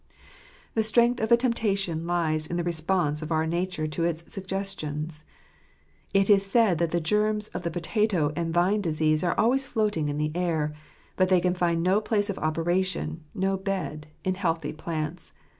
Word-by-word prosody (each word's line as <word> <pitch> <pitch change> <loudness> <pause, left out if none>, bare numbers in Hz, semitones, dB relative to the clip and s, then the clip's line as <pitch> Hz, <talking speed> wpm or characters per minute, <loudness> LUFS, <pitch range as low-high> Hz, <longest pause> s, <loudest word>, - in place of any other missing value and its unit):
The 220 - +2
strength 235 +2 +3
of 220 +1 -1
a 235 - +8
temptation 195 -9 0
lies 155 -3 0
in 175 - -3
the 175 - 0
response 165 -2 0
of 155 +1 -6
our 160 0 +2
nature 170 -1 -1
to 155 +2 -2
its 170 -1 -1
suggestions. 165 -6 -4 0.9
It 195 0 +3
is 200 -2 +5
said 200 -4 +3
that 170 -1 +1
the 170 - 0
germs 210 +5 +1
of - - -5
the 170 - -2
potato 175 -3 0
and 170 -1 -1
vine 180 +5 +2
disease 155 -2 +1
are 175 - 0
always 265 +4 +3
floating 210 -11 0
in 145 - -2
the 150 0 0
air; 160 -4 0 0.4
but 185 0 +3
they 185 -1 +5
can 180 +1 +1
find 170 -2 +1
no 190 +4 +3
place 210 -1 0
of 190 - -7
operation 165 0 -1
— - - -30
no 195 0 +1
bed— 185 -6 -3 0.2
in 185 - +1
healthy 165 -6 -1
plants. 160 +1 -5
175 Hz, 180 wpm, -27 LUFS, 160-195 Hz, 0.9 s, a